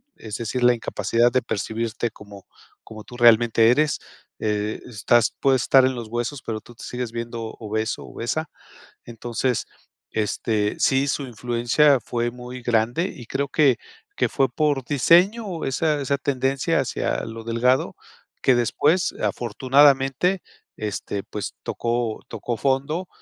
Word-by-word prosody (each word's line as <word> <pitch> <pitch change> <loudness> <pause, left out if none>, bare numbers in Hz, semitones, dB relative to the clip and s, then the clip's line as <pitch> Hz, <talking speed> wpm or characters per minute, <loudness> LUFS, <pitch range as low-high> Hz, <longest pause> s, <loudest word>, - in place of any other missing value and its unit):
es 110 -2 -8
decir, 120 +2 -3
la 125 0 +6
incapacidad 115 +1 +1
de 130 - +2
percibirte 115 +1 -3
como 100 -3 -13 0.4
como 110 -1 -10
tú 120 - -12
realmente 115 -1 +5
eres. 150 +3 +2 0.4
Eh, 105 0 -2
estás 120 0 +2
puedes 135 -3 +3
estar 130 -1 +5
en 130 - 0
los 120 -2 -6
huesos, 120 +4 -3
pero 110 -1 -3
tú 120 - -16
te - - -12
sigues 125 -2 -4
viendo 115 0 -5 0.2
obeso, 110 0 -3
obesa. 155 +8 -3 0.6
Entonces, 120 +1 -2 0.4
este 105 0 -1
sí, 135 +1 +3
su 145 - -1
influencia 125 +4 +2
fue 120 0 -2
muy 125 0 -9
grande 120 +8 +1
y 120 - -11
creo 140 +4 -1
que 140 -4 +3 0.4
que - - +1
fue 135 -3 +1
por 145 0 0
diseño 175 - +3
esa 150 +3 0
esa 140 +1 0
tendencia 135 +3 0
hacia 130 - -2
lo 115 0 -7
delgado 120 +3 +1 0.5
que 130 - +5
después, 145 - +2
afortunadamente, 135 - +3 0.3
este, 105 -1 -4
pues, 105 -2 -6
tocó 120 -1 -2
tocó 120 -2 -4
fondo, 140 +7 0
120 Hz, 140 wpm, -23 LUFS, 115-135 Hz, 0.6 s, la